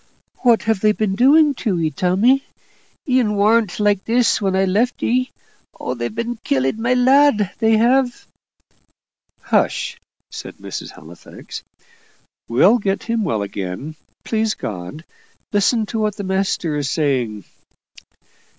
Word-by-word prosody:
"What 235 -3 +3
have 220 -2 0
they 215 +1 +3
been 210 -2 -1
doing 285 +7 +5
to 195 -8 0
'ee, 160 -2 0
Tommy? 200 - +2 0.6
'ee 255 -1 +3
warn't 210 -1 +1
like 205 -2 +2
this 235 -1 +2
when 195 -2 0
I 190 0 +2
left 215 +7 0
'ee. 255 +2 +1 0.5
Oh, 125 - -3
they've 120 - -5
been 235 +1 -3
killing 135 +3 -1
my 245 +2 +2
lad, 255 -5 +4
they 220 0 +3
have!" 245 +2 +1 1.2
"Hush!" - - 0 0.3
said - - -9
Mrs. - - -7
Halifax; - - -11 0.9
"we'll 240 - +4
get 195 -2 -2
him 230 -1 -1
well 110 - -1
again, 100 +9 -6 0.3
please 220 -1 0
God. 100 - -7 0.5
Listen 215 +2 +2
to 225 +1 -4
what 210 -1 0
the 205 - -6
master's 180 -7 -1
saying." 125 - -1
210 Hz, 130 wpm, -19 LUFS, 170-235 Hz, 1.2 s, doing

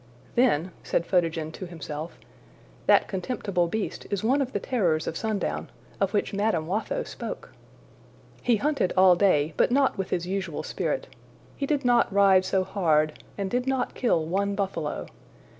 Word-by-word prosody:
``Then,'' 190 - +3
said 170 - -1
Photogen 165 -4 0
to 185 +3 -7
himself, 160 -1 -7 0.7
``that - - +6
contemptible 190 -3 -1
beast 215 +4 -4
is 200 -1 -2
one 265 +6 +3
of 260 -1 -2
the - - -1
terrors 175 -11 0
of - - -3
sundown, 215 0 -2 0.3
of 195 -1 +1
which 205 - 0
Madame 200 -6 +1
Watho 220 - -2
spoke!'' - - -7 0.9
He 245 - +3
hunted 275 -4 0
all 185 -1 +7
day, 160 -5 +3
but - - +4
not 265 -4 +2
with 190 - -2
his 175 -1 -1
usual 185 -4 -3
spirit. - - -2 0.5
He 280 - -3
did 285 -3 0
not 240 -3 +4
ride 195 -1 +5
so 190 0 +1
hard, 160 -6 +1 0.2
and 195 -1 -3
did 250 +1 0
not 265 -2 0
kill 170 -10 +1
one 200 +4 0
buffalo. 190 -7 -2
195 Hz, 160 wpm, -26 LUFS, 170-230 Hz, 0.9 s, all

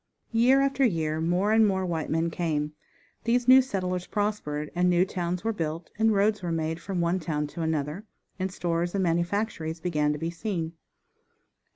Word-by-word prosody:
Year 245 +4 +5
after 275 0 +1
year 160 -8 +1
more 180 +5 +1
and 220 -1 +5
more 190 -1 0
white 165 -3 -2
men 165 +1 0
came. 155 -3 -1 0.5
These 240 +1 +2
new 260 +1 +9
settlers 185 -7 -3
prospered, 180 -8 -2
and 180 +1 +2
new 175 +1 +4
towns 180 -1 -3
were 225 0 0
built, 165 -2 -4
and 220 0 +4
roads 210 +1 +2
were 175 -2 -3
made 165 0 -2
from 185 -1 -2
one 170 +2 +1
town 150 -3 -2
to 150 +3 -7
another, 160 +4 -2 0.3
and 185 0 -1
stores 175 0 -1
and 195 - +1
manufactories 170 -1 -1
began 150 -4 +1
to 150 - -2
be 165 +2 -3
seen. 170 -3 -3
175 Hz, 180 wpm, -27 LUFS, 160-205 Hz, 0.5 s, new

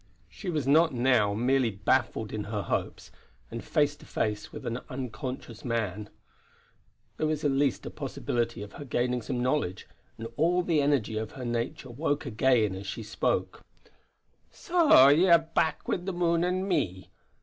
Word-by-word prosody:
She 195 - -7
was 150 -6 -1
not 155 0 +4
now 120 -5 +3
merely 125 +2 +2
baffled 110 +2 0
in 105 -1 -3
her 105 -1 -3
hopes, - - -3 0.4
and - - -6
face 145 -1 +1
to - - -16
face 105 -1 -2
with - - -9
an 115 +1 -2
unconscious 125 -2 -6
man; 105 -4 -2 1.1
there 155 - 0
was 155 -1 -2
at 145 - +2
least 135 -1 +1
a - - -5
possibility 120 -3 -3
of 105 - -11
her - - -8
gaining 125 -2 -1
some 120 +2 -3
knowledge, 125 -8 -1 0.3
and 115 - -6
all 175 +4 +2
the 165 -4 +2
energy 130 -7 +1
of 110 -1 -6
her 130 -2 -7
nature 120 +2 -3
woke 145 +3 -1
again 115 -2 +2
as 95 +1 -7
she 110 +4 -5
spoke: 105 - -1 0.9
"So 335 - +5
ye 160 +6 +5
are 170 - +9
back 165 -1 -1
wi' - - +1
the 185 +2 -5
moon 170 -1 +1
and 185 +2 0
me. 95 - -1
130 Hz, 170 wpm, -28 LUFS, 110-155 Hz, 1.1 s, are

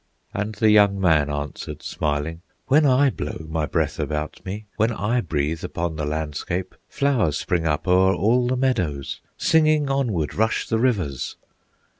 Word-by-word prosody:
And 105 +1 -3
the 110 -1 +3
young 100 -2 +5
man 80 -6 +3
answered, 75 -1 -5
smiling: 75 +2 -2 0.2
"When 145 +2 +4
I 135 +1 +4
blow 80 - -5
my 80 -1 -1
breath - - -1
about 75 0 -3
me, 105 +3 -6
When 110 +2 +2
I 120 +2 0
breathe 80 -2 -2
upon 85 -1 -3
the 75 -1 -3
landscape, 80 +4 -3 0.2
Flowers 120 - +1
spring 85 -3 -1
up 75 +4 -1
o'er 95 +1 +4
all 120 +7 +2
the 130 +1 0
meadows, 90 - -1 0.2
Singing, 155 -3 +3
onward 115 - 0
rush 110 +1 0
the 115 - 0
rivers!" 95 - -1
95 Hz, 155 wpm, -23 LUFS, 75-120 Hz, 0.2 s, young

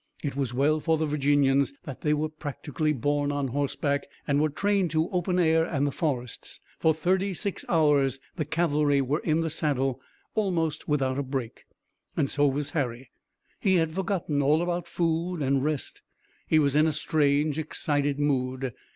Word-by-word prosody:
It 140 -3 -2
was 135 -4 -1
well 145 +5 +2
for 160 +1 +1
the 160 - 0
Virginians 140 -2 +2
that 135 - -8
they 150 - +1
were 150 +1 +1
practically 155 0 -3
born 145 +1 0
on 140 -2 -1
horseback 140 +1 -1 0.2
and 145 0 +2
were 155 - +2
trained 200 +3 +1
to 160 +1 +1
open 180 0 0
air 160 -2 +4
and 145 -4 0
the 145 - 0
forests. 130 -6 -3 0.2
For 160 - +4
thirty 185 +5 0
six 200 +2 -3
hours 145 -5 +3 0.2
the 160 - -1
cavalry 150 -2 +2
were 135 +3 0
in 160 0 +1
the 165 -1 -2
saddle 135 -5 -1 0.3
almost 165 -7 -1
without 135 -3 +1
a - - +1
break. 130 -4 -5 0.5
And 140 - +2
so 145 +1 +2
was 145 +1 -1
Harry. 130 -4 -3 0.5
He 190 -1 +3
had 165 -2 +1
forgotten 175 -5 -1
all 150 +4 +3
about 175 0 -2
food 170 -1 -1
and 135 0 +1
rest. 150 -2 -3 0.5
He 155 - +4
was 145 -2 +3
in 155 +1 +5
a 155 - 0
strange, 150 0 +1
excited 145 -2 -1
mood. 130 -3 -1
150 Hz, 175 wpm, -27 LUFS, 140-160 Hz, 0.5 s, in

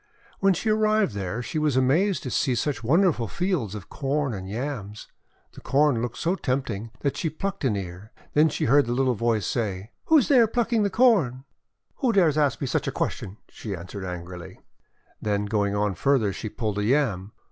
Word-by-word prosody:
When 195 -1 +3
she 215 +6 0
arrived 215 - +2
there, 100 +4 -3
she 155 - -3
was 150 -4 +1
amazed 170 +10 +2
to 130 - -4
see 130 0 +1
such 125 -2 -2
wonderful 155 - +2
fields 170 - -2
of 100 - -8
Corn 140 -1 -1
and 95 -2 -6
Yams. 110 -3 -5 0.4
The - - -13
Corn 140 -4 +2
looked 120 -1 -4
so 170 - 0
tempting 125 - -2
that 140 - -1
she 165 - -1
plucked 195 +5 -4
an 115 -5 +2
ear. 95 +2 -7 0.2
Then 155 +2 +5
she - - -2
heard 140 +1 +4
the 120 - 0
little 130 -1 +2
voice 115 -1 0
say: 105 -2 -3
— - - -54
'Who 320 - +5
is 275 - +3
there, 245 -5 +5
plucking 230 0 +1
the 200 - +2
Corn?' 190 - +3 0.6
'WTio 250 -4 +2
dares 165 -6 +4
ask 140 -5 +1
me - - 0
such 125 - -1
a - - 0
question?" 95 +3 -3
she 105 -4 -6
an 85 -1 -9
swered 95 0 -7
angrily. 90 -1 -8 0.6
Then, 105 -1 0
going 100 -1 0
on 105 -1 0
farther, 110 0 +1
she 110 - -5
pulled 105 -2 -3
a - - 0
Yam. 110 -5 0
125 Hz, 200 wpm, -25 LUFS, 105-160 Hz, 0.6 s, Then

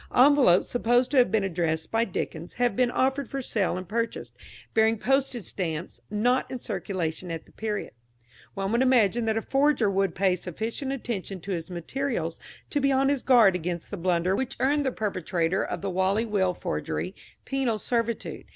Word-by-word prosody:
Envelopes 260 -8 +6
supposed 245 +1 +2
to 285 - +1
have 245 -4 +6
been 210 0 +1
addressed 165 -4 -1
by 225 +1 +2
Dickens 175 -3 -5
have 245 -4 +1
been 250 +1 +3
offered 265 +1 0
for 275 - -3
sale 210 -8 0
and 185 -1 -6
purchased, 230 +2 -3 0.4
bearing 220 0 +3
postage 265 -3 0
stamps 165 -3 -4
not 240 +5 +1
in 255 - -4
circulation 185 -6 -3
at 165 -1 -5
the - - -20
period. 215 -2 -4 0.6
One 195 0 -2
would 235 +2 +2
imagine 240 -3 +3
that 220 0 +1
a 225 - -1
forger 275 -6 +2
would 195 -3 0
pay 190 -1 +2
sufficient 220 - -4
attention 220 -7 -4
to 200 - -6
his 170 -1 -3
materials 175 - -3 0.3
to 290 - +1
be 275 0 +3
on 270 +1 +3
his 280 -2 +1
guard 230 -8 +5
against 175 -1 -4
the - - -2
blunder 180 +1 +1
which 265 +3 -3
earned 285 +1 +2
the - - +1
perpetrator 185 -4 -1
of - - -4
the 200 - -2
Whalley 190 +5 +1
Will 190 -5 +1
Forgery - - -3 0.3
penal 265 -5 0
servitude. 230 +1 -2
220 Hz, 180 wpm, -27 LUFS, 185-255 Hz, 0.6 s, Envelopes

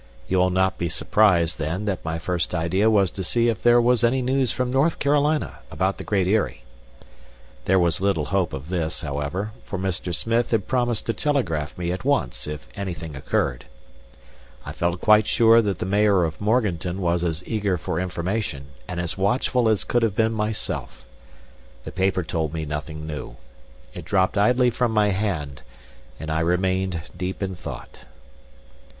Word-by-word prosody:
You 95 - +1
will 90 0 +4
not 95 +1 +1
be 85 - -1
surprised, 90 -4 +2
then, 85 +6 -2
that 95 -4 -2
my 80 0 -2
first 85 0 -2
idea 90 +6 +2
was 100 -5 +3
to 95 - -5
see 120 +6 +2
if 110 -5 -2
there 120 0 +6
was 120 0 +3
any 125 +2 +2
news 130 -1 +1
from 125 -1 -1
North 140 +6 +2
Carolina 145 +2 +1
about 95 +1 -1
the - - -5
Great 95 -3 +1
Eyrie. 105 +2 0 1.0
There 95 - +3
was 85 -2 +2
little 95 -6 +1
hope 95 -4 +1
of 70 +4 -7
this, 85 -3 -2
however, 75 +8 -3
for 95 - -5
Mr. 95 -1 -2
Smith 115 +7 0
had 110 -4 0
promised 120 -3 0
to 115 - 0
telegraph 90 - -1
me 90 -1 -2
at 90 +1 -4
once 65 - 0
if 75 -5 -6
anything 90 -6 -5
occurred. - - -1 1.0
I - - -5
felt 85 0 -1
quite 110 0 +5
sure 115 0 +5
that 100 -3 -1
the - - -3
mayor 100 -1 +3
of 80 +1 -3
Morganton 100 -5 0
was 85 -1 0
as 85 0 -2
eager 105 -5 0
for 80 +1 -3
information 90 -5 -3 0.2
and 90 - -4
as 85 +2 -2
watchful 120 +3 +2
as 110 -2 +1
could 120 - +1
have 110 -4 +1
been 110 +1 +2
myself. 105 - -4 0.8
The - - -7
paper 95 -1 0
told 80 0 -2
me 80 -1 -3
nothing 75 +1 -5
new. 75 -2 -6 0.6
It - - -8
dropped 95 -2 +1
idly 125 +4 +3
from 120 -1 0
my 105 -1 +3
hand; 80 -10 -2 0.6
and 80 0 -5
I 80 - +1
remained 90 +1 0
deep 90 +2 -4
in 95 -1 -2
thought. 90 - -9
95 Hz, 175 wpm, -23 LUFS, 85-110 Hz, 1.0 s, there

